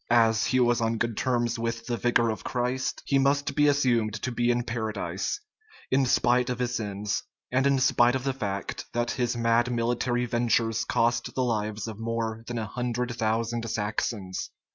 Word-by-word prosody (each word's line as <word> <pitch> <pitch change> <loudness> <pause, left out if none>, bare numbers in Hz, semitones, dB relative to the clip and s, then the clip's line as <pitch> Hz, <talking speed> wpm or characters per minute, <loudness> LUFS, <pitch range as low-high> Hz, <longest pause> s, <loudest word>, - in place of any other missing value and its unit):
As 115 -2 +4
he 130 - +2
was 120 -1 +3
on 115 0 +1
good 115 0 -1
terms 120 -1 0
with 115 0 -3
the 120 0 -1
Vicar 115 +1 +2
of 110 - -6
Christ, 125 +1 -2
he 140 - +2
must 140 +1 +2
be 150 +1 +4
assumed 120 -7 +2
to 125 - -1
be 120 0 +1
in 120 0 +2
Paradise, 110 - -3 0.5
in 135 0 +3
spite 125 0 +3
of 125 - -1
his 125 0 -1
sins, 105 -1 -2 0.3
and 130 +2 +3
in 140 -1 +3
spite 130 -2 +4
of 130 - -2
the 135 -1 0
fact 100 -6 -4
that 120 0 0
his 120 -2 -1
mad 115 +1 +2
military 120 +1 0
ventures 115 -1 +1
cost 120 0 0
the 130 - +1
lives 110 -2 -1
of 110 -1 -7
more 115 0 -2
than 120 - -3
a 110 - -2
hundred 120 +1 -2
thousand 115 +1 -1
Saxons. 105 -2 -2
120 Hz, 185 wpm, -27 LUFS, 115-125 Hz, 0.5 s, As